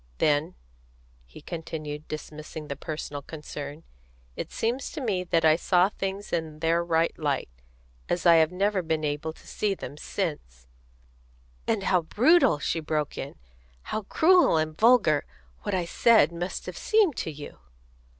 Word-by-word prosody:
Then," 150 +4 +1 0.7
he - - -13
continued, 155 -2 -6
dismissing 155 0 -7
the 140 - -3
personal 150 -2 -5
concern, 150 0 -8 0.5
"it - - -5
seems 240 +4 -2
to 315 - -5
me 205 -9 -1
that 165 -2 +2
I 155 0 +6
saw 180 +2 +3
things 195 0 -5
in 160 -2 -2
their 165 +2 +1
right 165 -1 +1
light, 145 - -1 0.6
as 175 0 -1
I 170 -1 +8
have 160 0 +4
never 195 +1 +1
been 160 -2 -1
able 150 +1 -2
to - - -18
see 205 -2 -1
them 145 -4 -8
since 60 - -4 0.5
" - - -32
"And 220 -3 0
how 180 -2 +3
brutal," 230 - +4
she 155 +3 -1
broke 155 -2 -2
in, 135 - -6 0.6
"how 215 - 0
cruel 330 - +4
and 155 0 -1
vulgar, 215 -9 +4 0.4
what 200 - -2
I 180 -2 0
said 220 -2 +4
must 175 +2 -5
have - - -7
seemed 425 - +3
to - - -2
you!" 145 - -10
160 Hz, 160 wpm, -27 LUFS, 150-190 Hz, 0.7 s, I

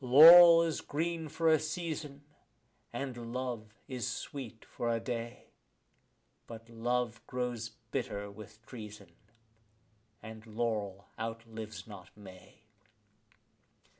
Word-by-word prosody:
Laurel 165 +6 +10
is 165 -2 -2
green 165 +2 -3
for 165 +2 -1
a 160 -1 +5
season, 155 -3 -5 0.7
and 120 -2 -5
love 120 -4 -4 0.2
is 125 -5 -4
sweet 125 -5 -6
for 120 - -4
a 115 0 +1
day; 115 0 -6 1.0
But 115 -1 -10
love 115 0 -1
grows 125 -3 -3 0.2
bitter 100 0 -3
with 110 +2 -13
treason, 105 -4 -10 1.1
and 110 0 -10
laurel 105 -3 -3
outlives 110 -3 -6
not 95 -4 -11
May. 95 +2 -14
115 Hz, 105 wpm, -32 LUFS, 110-140 Hz, 1.1 s, Laurel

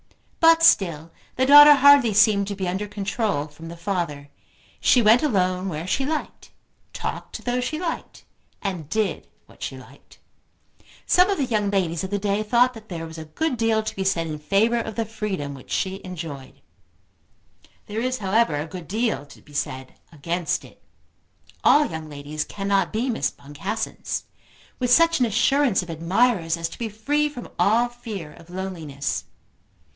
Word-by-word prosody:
But 330 0 +6
still 165 - +3 0.2
the 260 - +2
daughter 290 +2 +10
hardly 275 -6 +6
seemed 205 -2 +4
to 200 - -4
be 190 -2 -3
under 190 +4 -2
control 205 -6 -2
from 155 +2 -12
the 170 +1 -9
father. 170 -7 -3 0.5
She 250 - +4
went 225 +1 +5
alone 185 -8 0
where 160 -1 -5
she 255 +8 0
liked; 310 0 -4 0.4
talked - - -5
to - - -7
those 245 0 -1
she 310 +5 -3
liked; 340 -2 -5 0.4
and 180 -7 -4
did 215 0 -1 0.2
what - - -21
she - - -5
liked. - - -16 0.9
Some 360 +2 +4
of 395 - 0
the 275 - 0
young 215 -4 0
ladies 180 -4 0
of 190 - -4
the 205 - -1
day 200 +1 0
thought 245 +4 +3
that 220 -2 -13
there 165 -3 -5
was 160 0 -9
a 160 - -7
good 300 - -2
deal 225 -1 +1
to 215 - -5
be 195 - -2
said 180 -3 0
in 155 -2 -5
favour 215 +9 +2
of 220 -2 -5
the 230 - -1
freedom 200 -10 -4
which 135 -2 -13
she 190 +1 -2
enjoyed. 160 -7 -8 1.2
There 215 +2 -4
is 255 +1 -1
however 205 -4 +1
a 145 +1 -2
good 170 -1 -9
deal 215 -8 -1
to - - -16
be 145 - -18
said 130 -2 -4 0.2
against 170 +2 -2
it. - - -18 0.8
All 295 +1 +6
young 160 - -6
ladies 145 +1 -5
cannot 195 -1 -1
be 235 +4 -1
Miss 225 - 0
Boncassens, 145 +10 -5 0.6
with 250 -1 0
such 330 +3 +5
an 245 - +3
assurance 240 -1 +2
of 175 - -12
admirers 170 +1 +1
as 165 0 -2
to - - -12
be 230 -2 -3
free 290 +8 0
from 250 -5 -9
all 230 +4 +3
fear 215 -10 -8
of 165 - -17
loneliness. 175 -7 -4
200 Hz, 175 wpm, -23 LUFS, 165-240 Hz, 1.2 s, daughter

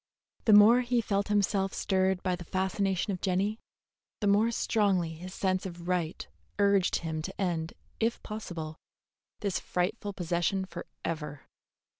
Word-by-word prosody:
The 220 - +6
more 215 +4 +8
he 245 0 +1
felt 200 -3 0
himself 200 -2 +1
stirred 190 -1 +1
by 185 -1 +1
the 175 - -8
fascination 190 +2 0
of 180 - -5
Jenny, 200 +3 0 0.6
the 210 - -2
more 205 +3 +4
strongly 200 -7 +1
his 180 +3 -8
sense 185 -1 0
of 175 -2 -7
right 175 -3 -1 0.3
urged 200 -2 +3
him 160 -1 -2
to 190 +4 -7
end, 170 -4 -1 0.3
if 230 +1 +1
possible, 170 -8 -6 0.6
this 200 -4 0
frightful 200 +3 -2
possession 175 +2 0
forever. 160 -4 -6
190 Hz, 140 wpm, -30 LUFS, 175-205 Hz, 0.6 s, more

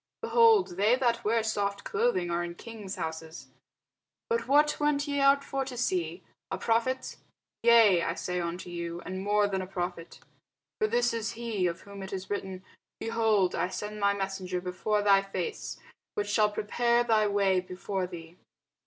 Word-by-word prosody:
behold, 445 - +4
they 210 +5 +4
that 240 -2 0
wear 225 +1 +2
soft 200 -2 -1
clothing 185 -8 0
are 170 0 0
in 170 0 -6
kings' 215 -2 -8
houses. 160 0 -6 0.8
But 465 - 0
what 295 +2 +4
went 295 0 +1
ye 285 0 -1
out 275 0 +5
for 270 -1 -2
to 255 -2 -7
see? 180 -6 -1 0.3
A - - -3
prophet? 235 +3 0 0.4
yea, 225 -6 +6
I 165 - -1
say 180 -1 -3
unto 175 +1 -5
you, 170 0 -5
and 185 +1 -5
more 205 0 +3
than 190 -1 -2
a 185 - -6
prophet. 175 -2 -5 0.6
For 430 - +3
this 475 - +1
is 225 0 -2
he, 225 -5 -1
of 170 -1 -4
whom 200 -1 -10
it 190 0 -7
is 190 0 -5
written, 190 -2 -4 0.4
Behold, 220 -4 +2
I - - 0
send 210 +3 -6
my 200 0 +2
messenger 190 -2 -3
before 190 +4 -1
thy 200 -1 +5
face, 195 - -5 0.4
which 205 0 -2
shall 210 0 +4
prepare 235 +3 +1
thy 220 -3 +3
way 200 -2 +2
before 185 +1 -4
thee. 170 -1 -10
205 Hz, 170 wpm, -29 LUFS, 185-235 Hz, 0.8 s, yea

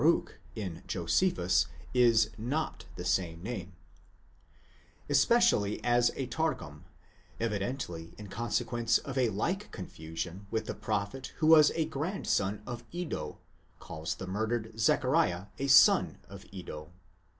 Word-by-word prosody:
Baruch, 165 +3 +2 0.2
in 95 -7 -5
Josephus, - - +2 0.3
is 115 -4 +4
not 135 +8 -3
the - - -6
same 85 -2 0
name) 95 -5 -5 0.7
;* 85 - -31
especially 140 - +4
as 120 0 +4
a 135 - -2
Targum, 125 - -3 0.5
evidently 100 -6 -3
in 105 - -9
consequence 115 +2 0
of 135 - -7
a 125 -3 +3
like 175 - -2
confusion 85 +2 -6
with 110 0 -1
the - - -3
prophet 105 +5 -3
who 155 - 0
was 155 -1 +8
a 160 - +1
grandson 140 - -1
of 120 -1 -6
Iddo, 155 - -4 0.4
calls 80 0 -5
the 95 - -7
murdered 110 +4 -2
Zechariah 125 - +2
a 140 - -1
son 135 0 +6
of 100 0 -11
Iddo. 85 -5 -8
110 Hz, 130 wpm, -31 LUFS, 95-135 Hz, 0.7 s, was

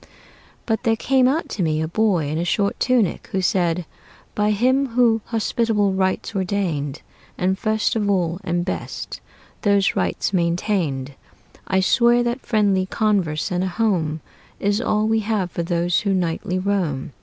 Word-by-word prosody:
"' - - -29
"But 225 -1 0
there 225 -3 +2
came 255 +2 +2
out 300 +6 0
to 200 - -4
me 155 -2 +1
a 160 - -1
boy 185 -3 +1
in 155 +3 -2
a - - 0
short 200 +3 0
tunic, 245 -7 +1
who 190 - 0
said: 180 -2 +1 0.5
"'By 210 0 +1
Him 255 +6 +2
who 230 -2 +2
hospitable 225 -3 0
rites 190 +3 -1
ordained, 180 -8 -2 0.3
And 185 +1 +1
first 220 +3 0
of 210 -2 0
all, 175 -3 0
and 175 +1 -1
best, 185 - -5 0.4
those 200 -1 +2
rites - - -1
maintained, 170 -6 0 0.5
I 190 0 +2
swear 240 +4 +4
that 240 +2 -2
friendly 200 -4 +1
converse 190 -9 0
and 180 0 0
a - - 0
home 175 -6 0 0.4
Is 205 +3 +1
all 215 -2 +1
we 225 0 +2
have 210 -4 -1
for - - -3
those 170 +1 +1
who 200 -3 0
nightly 180 0 -1
roam." 185 -9 -1
195 Hz, 165 wpm, -22 LUFS, 175-220 Hz, 0.5 s, swear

